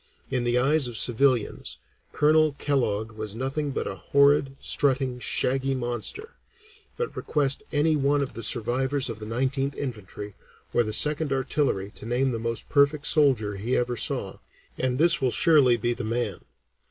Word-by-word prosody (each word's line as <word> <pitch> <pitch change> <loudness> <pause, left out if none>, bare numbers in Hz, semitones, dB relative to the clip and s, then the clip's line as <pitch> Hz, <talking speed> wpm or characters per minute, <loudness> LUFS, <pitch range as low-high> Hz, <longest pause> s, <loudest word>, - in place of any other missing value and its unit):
In 125 -2 -1
the 120 0 +1
eyes 140 +2 +2
of 120 -2 -4
civilians, 120 - +1 0.3
Colonel 155 0 +3
Kellogg 120 -7 -1
was 110 -1 -6
nothing 135 +4 -3
but 135 - -3
a - - -4
horrid, 140 -1 +2
strutting, 130 -3 +1
shaggy 135 +2 0
monster. 125 - -3 0.6
But 470 - -4
request 140 -3 0
any 155 +1 +2
one 140 0 +1
of 135 - -6
the 115 - -7
survivors 130 +5 0
of 110 -2 -6
the 105 - -8
Nineteenth 135 +4 -2
Infantry 105 -5 -7 0.4
or - - +3
the 110 -2 -2
Second 150 +4 +3
Artillery 130 -7 -1
to 110 - -8
name 130 +2 0
the 115 - -3
most 115 0 -4
perfect 145 +1 +2
soldier 125 -10 +2
he 115 +6 -1
ever 120 0 -1
saw, 110 - -1 0.4
and 125 -1 -1
this 170 +2 +3
will 130 - +2
surely 130 -1 +4
be 120 +2 -1
the 125 - -6
man. 110 -3 -2
130 Hz, 165 wpm, -25 LUFS, 115-140 Hz, 0.6 s, surely